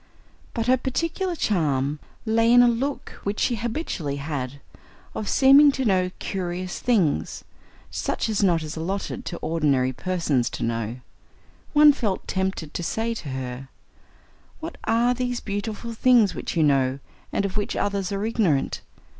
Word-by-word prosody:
But 230 - -1
her 255 +2 +4
particular 330 +8 -2
charm 150 - 0 0.3
lay 225 +1 +3
in 245 0 +8
a - - +6
look 260 +4 -2
which 200 +1 -2
she 240 - +1
habitually 220 - -3
had, 140 -2 -4 0.5
of 215 - -4
seeming 280 +2 +7
to 265 -1 -2
know 185 -3 +2
curious 180 -1 -4
things 175 - +1 0.5
such - - -2
as 215 -2 -1
it 195 - +5
is 155 0 -6
not - - -9
allotted 190 +5 -3
to 175 - -4
ordinary 140 -6 +1
persons 160 -7 0
to - - -4
know. 115 +1 -2 0.7
One 295 0 +8
felt 215 -9 -2
tempted 190 -5 -2
to - - -3
say 225 +7 -1
to 165 -10 -7
her: 130 0 -5 0.9
"What 325 +1 -7
are 235 +2 +3
these 245 -1 -2
beautiful 215 +3 -4
things 230 -4 +4
which - - -5
you 160 - +4
know, 135 -2 +2 0.3
and 200 - 0
of 190 - -4
which 205 -1 -2
others 200 -1 -1
are 200 +1 -1
ignorant? 195 -11 +1
195 Hz, 155 wpm, -24 LUFS, 150-235 Hz, 0.9 s, in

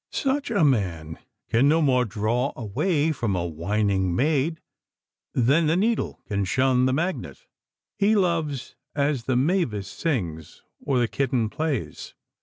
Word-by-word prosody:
Such 280 0 -1
a 200 -7 +2
man 90 - 0 0.3
can 125 +5 +4
no 160 +2 +4
more 130 -5 +3
draw 115 +6 -1
away 145 - 0
from 120 -9 -1
a 85 -1 -1
winning 95 +2 0
maid 155 - +1 0.8
than 140 +7 +3
the 160 +3 +2
needle 220 +4 -1
can 100 -2 -1
shun 130 +4 +2
the - - +1
magnet. 175 - -3 0.5
He 210 +2 +4
loves 165 - -1 0.2
as 140 -4 0
the 130 - 0
mavis 125 - 0
sings 90 - -4 0.2
or 135 - +1
the 120 -1 +2
kitten 125 -4 -1
plays. 155 -6 -3
130 Hz, 140 wpm, -25 LUFS, 105-160 Hz, 0.8 s, can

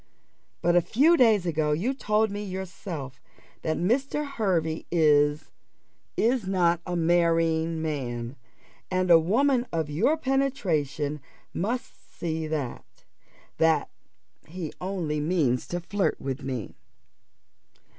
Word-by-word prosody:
But 175 +1 +3
a 175 - +6
few 290 - +4
days 220 - +4
ago 155 -3 +1
you 205 - 0
told 215 -4 +1
me 205 +1 -4
yourself 180 -8 -6 0.4
that 160 - -1
Mr. 270 - 0
Hervey 180 - -1
is 150 -2 +3 0.7
is 235 -3 +1
not 175 -3 +2
a 180 - -2
marrying 165 -1 +2
man; 125 -5 -3 0.5
and 185 -1 +1
a 165 - +9
woman 245 - +2
of 160 -3 -2
your 225 - +2
penetration 170 - -1 0.3
must 235 +7 -4
see 160 -2 -2
that 150 -5 -5 0.6
that 160 -1 +3 0.6
he 165 -1 -6
only 180 -5 -2
means 150 -6 +1
to 175 - -3
flirt 180 -2 -1
with 135 +1 -4
me. 130 -7 -4
170 Hz, 115 wpm, -26 LUFS, 155-205 Hz, 0.7 s, a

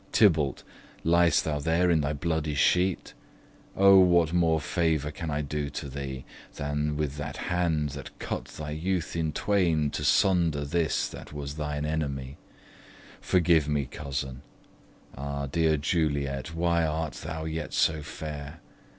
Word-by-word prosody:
Tybalt, 80 - +3 0.4
ly'st 85 +1 +4
thou 75 -2 -1
there 80 +4 +2
in 80 -2 +3
thy 70 +1 -1
bloody 80 0 -1
sheet? 90 +5 +2 0.6
O, 100 0 +8
what 85 -3 +4
more 80 -2 +3
favour 80 -2 0
can 80 +1 -5
I 75 0 -1
do 75 0 -3
to 70 +1 -5
thee, 65 -1 -6 0.3
Than 75 +1 -2
with 75 -2 -2
that 75 - -5
hand 85 -4 0
that 70 -2 -9
cut - - -4
thy 75 -1 -7
youth 85 +3 -2
in 80 -2 0
twain, 85 -7 +1
To 75 - -4
sunder 85 -2 +3
his 80 +1 0
that - - -10
was 70 -1 -5
thine 75 -1 -3
enemy? 70 -4 -3 0.8
Forgive 85 -4 +3
me, 75 -2 0
cousin! 65 -1 -5 0.7
Ah, 70 +1 -4
dear 80 +2 +2
Juliet, 70 -1 -1
Why 85 0 +2
art 80 0 -1
thou 80 0 -4
yet 80 -1 -4
so 80 -1 +2
fair! 75 -1 -7
75 Hz, 145 wpm, -28 LUFS, 70-85 Hz, 0.8 s, O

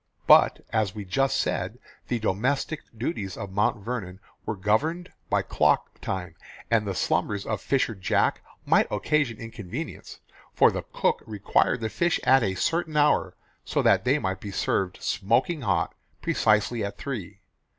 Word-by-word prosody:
But, - - +6
as 110 -3 +1
we 105 -2 -6
just 135 +9 +1
said, - - -1 0.3
the 120 - 0
domestic 130 +9 -1 0.2
duties 105 - -3
of 100 - -6
Mount 105 +1 0
Vernon 100 -7 -4 0.3
were 110 - -1
governed 145 - 0 0.2
by - - +2
clock - - +1
time, 90 -3 -4 0.4
and 110 -3 +3
the 95 - -2
slumbers 95 +4 0
of 105 -2 -2
fisher 130 -4 +1
Jack 95 -3 +1 0.2
might - - +3
occasion 145 -7 0
inconvenience, 115 - -7 0.4
for - - +6
the - - -4
cook - - +1
required 110 +3 +1
the 110 - -1
fish 170 - +1
at 135 +1 +5
a 95 -4 0
certain 160 - 0
hour, 150 0 +3 0.3
so - - -1
that - - +4
they 135 +4 +3
might 95 -8 -2
be 100 - -7
served 95 -1 -1
smoking 120 - +1
hot 95 -8 0 0.3
precisely 110 +2 +2
at 100 - -4
three. 105 -8 -6
110 Hz, 155 wpm, -26 LUFS, 100-135 Hz, 0.4 s, But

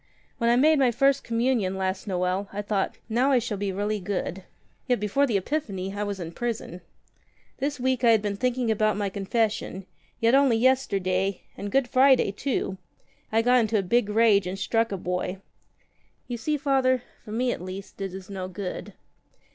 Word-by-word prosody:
"When 235 -1 +2
I 240 - +5
made 300 +4 +4
my 260 -2 +4
First 275 +3 +2
Communion 230 -5 0
last 190 +1 -2
Noel, 185 +1 -1
I 205 +1 -4
thought, 200 -1 -1
'now 245 +5 +2
I 265 - +5
shall 225 -4 -2
be 200 -1 -1
really 205 +2 -1
good.' 190 -1 -3 0.5
Yet 245 -3 +2
before 210 +8 +1
the 220 -5 +2
Epiphany 195 -5 -3
I 205 - -3
was 200 -1 -4
in 165 -2 -5
prison. 215 -3 -4 0.8
This 280 +1 -2
week 255 0 0
I 235 - +6
had 220 -2 +4
been 205 -1 -1
thinking 250 +1 0
about 215 -1 +1
my 205 -1 -1
confession; 200 -1 -1 0.3
yet 230 +1 +3
only 270 -4 +5
yesterday 195 -7 +1
— - - -36
and 200 0 -6
Good 270 +1 +2
Friday 260 -4 +4
too 200 -4 -2 0.3
— - - -37
I 225 +1 +3
got 250 +1 +5
into 220 -1 +1
a 200 - +1
big 210 +3 +1
rage 210 -3 +4
and 185 +2 -4
struck 225 +4 0
a 195 - -2
boy. 180 +1 -3 0.9
You 245 - -4
see. 300 +6 -1
Father, 265 -3 +2 0.2
for 215 - -10
me 245 +3 0
at - - -4
least 190 +2 -8
it 195 -1 -3
is 190 -1 -9
no 190 -2 -5
good." 185 +1 -6
215 Hz, 195 wpm, -26 LUFS, 195-250 Hz, 0.9 s, I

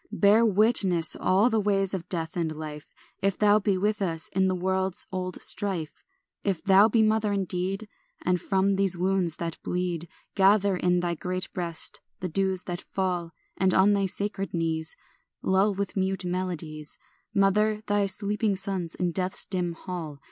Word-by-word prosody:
Bear 215 +1 +4
witness 200 -6 +3
all 190 +5 +3
the 225 -3 +1
ways 195 -2 +1
of 180 -3 -5
death 165 -3 0
and 165 -3 -2
life 150 -1 -8 0.3
If 195 -1 +1
thou 210 0 +5
be 200 -2 +1
with 210 +2 0
us 165 -4 -2
in 190 0 +1
the 185 - +1
world's 190 +1 -1
old 185 -1 -3
strife, 185 -7 -1 0.4
If 195 -5 -1
thou 200 +2 +6
be 225 0 +3
mother 215 -1 +2
indeed, 195 +1 -2 0.4
And 180 -1 +1
from 195 0 +1
these 195 -2 +3
wounds 185 -2 +1
that 165 -1 -5
bleed 175 -2 -2 0.2
Gather 200 0 +4
in 180 0 +1
thy 175 -1 -1
great 185 +3 -4
breast 170 -3 0 0.2
the 180 - -3
dews 190 +1 0
that 175 -1 -5
fall, 180 -3 -3 0.2
And 185 -1 +2
on 195 +2 +5
thy 200 -1 +1
sacred 195 0 -2
knees 160 -1 -1 0.5
Lull 195 +2 +2
with 200 0 -3
mute 190 -1 -1
melodies, 170 -4 -4 0.4
Mother, 210 +2 +2
thy 205 -1 +1
sleeping 205 +1 -1
sons 185 -3 -3
in 180 -1 -1
death's 185 +2 0
dim 180 -3 -2
hall. 165 -4 -6
190 Hz, 165 wpm, -27 LUFS, 175-200 Hz, 0.5 s, thou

